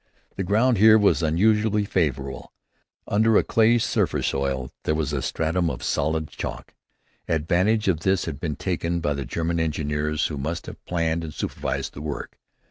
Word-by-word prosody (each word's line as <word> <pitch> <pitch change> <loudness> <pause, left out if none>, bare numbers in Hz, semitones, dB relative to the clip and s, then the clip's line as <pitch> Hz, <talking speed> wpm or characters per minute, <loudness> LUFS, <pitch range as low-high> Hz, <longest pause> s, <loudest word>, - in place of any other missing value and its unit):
The 95 - -2
ground 110 +4 +2
here 110 +1 +8
was 105 -4 +3
unusually 105 +6 +2
favorable. 70 -8 -2 0.6
Under 110 +1 +3
a - - +4
clayish 115 +1 +3
surface - - 0
soil, 65 -2 -1
there 75 - 0
was 75 -2 -1
a 70 - -1
stratum 80 +4 0
of - - -5
solid 80 +2 0
chalk. - - -6 0.5
Advantage 90 +7 +1
of 90 -5 +2
this 95 +2 +1
had 70 - -5
been 75 -3 -3
taken 85 -2 -2
by 75 -3 0
the 70 -2 -4
German 85 +4 -2
engineers 75 -1 -1
who 75 - -3
must 80 +5 -3
have - - -10
planned 85 -1 -1
and 75 -2 -7
supervised - - -3
the 70 - -8
work. 75 -1 -6
80 Hz, 170 wpm, -24 LUFS, 75-100 Hz, 0.6 s, here